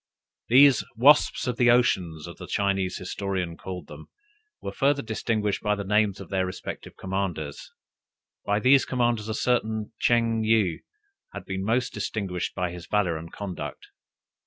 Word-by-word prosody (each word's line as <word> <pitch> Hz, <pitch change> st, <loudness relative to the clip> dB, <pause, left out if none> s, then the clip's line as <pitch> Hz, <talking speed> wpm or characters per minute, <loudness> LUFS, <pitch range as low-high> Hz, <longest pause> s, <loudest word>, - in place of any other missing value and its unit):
"These 135 Hz, +1 st, +6 dB
wasps 140 Hz, +6 st, +5 dB
of 125 Hz, -2 st, -2 dB
the 125 Hz, -1 st, +4 dB
Ocean," 95 Hz, -9 st, +2 dB
as 75 Hz, -, -9 dB, 0.2 s
a -, -, -7 dB
Chinese 95 Hz, -2 st, 0 dB
historian 90 Hz, -2 st, -3 dB
calls 90 Hz, -2 st, -7 dB
them, -, -, -12 dB, 0.5 s
were -, -, -5 dB
further 140 Hz, 0 st, +1 dB
distinguished 110 Hz, -2 st, -1 dB
by 105 Hz, -1 st, +1 dB
the 100 Hz, -, -4 dB
names 105 Hz, 0 st, +1 dB
of 95 Hz, -, -10 dB
their 95 Hz, -1 st, 0 dB
respective 95 Hz, 0 st, -7 dB
commanders: 95 Hz, -6 st, -4 dB, 0.7 s
by 105 Hz, +1 st, +1 dB
these 130 Hz, +3 st, +5 dB
commanders 120 Hz, -4 st, 0 dB
a 110 Hz, -, -2 dB
certain 110 Hz, -3 st, 0 dB
Ching 115 Hz, -2 st, +2 dB
yih 110 Hz, -6 st, +2 dB, 0.5 s
had -, -, -7 dB
been 95 Hz, 0 st, -4 dB
the 95 Hz, -, -4 dB
most 125 Hz, +2 st, 0 dB
distinguished 95 Hz, -5 st, -3 dB
by 90 Hz, -2 st, -1 dB
his 90 Hz, 0 st, -9 dB
valor 100 Hz, -5 st, +1 dB
and 80 Hz, +1 st, -8 dB
conduct. 90 Hz, -9 st, -7 dB
105 Hz, 160 wpm, -26 LUFS, 95-115 Hz, 0.7 s, These